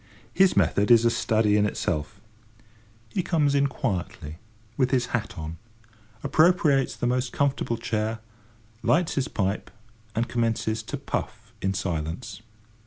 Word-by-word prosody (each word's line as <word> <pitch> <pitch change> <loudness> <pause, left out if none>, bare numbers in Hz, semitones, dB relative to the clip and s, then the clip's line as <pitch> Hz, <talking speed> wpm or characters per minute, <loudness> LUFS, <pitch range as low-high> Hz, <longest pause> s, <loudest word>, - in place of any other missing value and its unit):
His 190 -1 +4
method 100 +3 +3
is 120 -1 +6
a 115 - +4
study 110 -3 +2
in 105 0 +3
itself. 85 -1 -3 0.9
He 190 - -1
comes 155 -5 +1
in 140 0 +3
quietly 90 - -4 0.4
with 130 0 +2
his 125 -2 +2
hat 115 -3 -2
on, 80 +1 -6 0.7
appropriates 150 -2 +3
the - - -3
most 125 +1 0
comfortable 140 -4 0
chair, 110 0 -2 0.6
lights 170 0 +2
his 135 - 0
pipe, 100 0 -2 0.5
and 115 +2 0
commences 115 -1 0
to 110 +6 -5
puff 115 -4 -5
in 95 0 0
silence. 85 +1 -4
115 Hz, 135 wpm, -26 LUFS, 105-135 Hz, 0.9 s, is